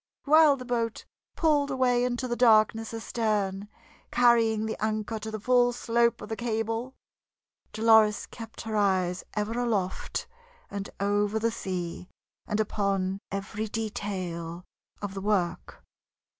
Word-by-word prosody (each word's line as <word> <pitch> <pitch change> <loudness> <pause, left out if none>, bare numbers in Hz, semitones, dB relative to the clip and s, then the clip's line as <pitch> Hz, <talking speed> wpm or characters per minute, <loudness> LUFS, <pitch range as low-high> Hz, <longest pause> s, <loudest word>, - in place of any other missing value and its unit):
While 305 0 +6
the 255 - -8
boat 235 -2 -2 0.3
pulled 295 -3 +2
away 255 -2 +2
into 250 +1 -1
the 240 - -1
darkness 225 -2 +4
astern, 210 -3 -1 0.4
carrying 230 -3 +3
the 220 - -2
anchor 215 0 -1
to 220 +1 -6
the 215 0 -5
full 245 +2 +3
scope 235 -1 +1
of 210 - -8
the 220 - -2
cable, 225 +2 -2 0.8
Dolores 220 -1 +4
kept 225 -2 -10
her 220 -1 -4
eyes 185 -3 +1
ever 215 +3 -1
aloft, 205 -6 -1 0.5
and 200 -1 -5
over 205 +1 +1
the 230 +1 +1
sea, 180 -3 -5 0.4
and 210 -1 -1
upon 195 -2 0
every 200 +2 -4
detail 185 -6 -4 0.4
of 200 -1 -3
the 195 - -5
work. 190 -4 -1
220 Hz, 130 wpm, -28 LUFS, 200-235 Hz, 0.8 s, While